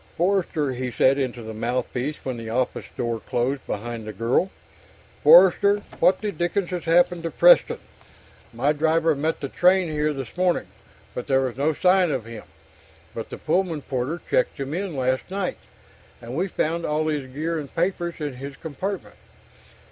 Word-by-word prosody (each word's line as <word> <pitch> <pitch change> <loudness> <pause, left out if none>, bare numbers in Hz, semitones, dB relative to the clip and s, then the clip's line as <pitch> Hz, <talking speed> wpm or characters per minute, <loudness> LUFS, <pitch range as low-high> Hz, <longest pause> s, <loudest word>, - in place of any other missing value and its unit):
"Forster," 170 -6 +1
he 125 0 -3
said 130 +3 +3
into 125 -3 -3
the 110 0 -7
mouthpiece 125 +5 -2
when 130 -2 -2
the 115 -1 -6
office 125 +2 -1
door 120 -1 -1
closed 125 +4 -2
behind 115 +2 -4
the - - -4
girl. 115 - +1 0.7
"Forster! 205 - +6 0.2
What 185 - +4
the 210 -1 -1
dickens 175 +1 -1
has 180 -1 -4
happened 175 +1 +3
to 165 - -3
Preston? - - +5 0.7
My 145 +2 +1
driver 160 +1 +2
met 155 +3 -2
the 140 - -2
train 180 +3 +3
here 150 0 0
this 135 -5 -6
morning, 180 -1 +1 0.5
but 125 - -5
there 135 -1 +3
was 130 -3 -2
no 145 +4 +1
sign 180 +3 +3
of 130 -6 -2
him. 115 -2 -9 0.7
But 115 - -6
the - - -7
Pullman 165 -2 0
porter 135 +5 -2
checked - - +1
him 135 +1 -4
in 185 -2 -3
last 130 +2 -1
night, 190 -1 -2 0.6
and 120 +1 -8
we 180 +5 0
found 170 -1 -1
all 155 0 0
his 145 -4 -2
gear 160 +4 -2
and 145 -2 -8
papers 175 0 -1
in 145 -5 -5
his 140 +1 -8
compartment!" 185 +6 -5
150 Hz, 170 wpm, -24 LUFS, 130-175 Hz, 0.7 s, Forster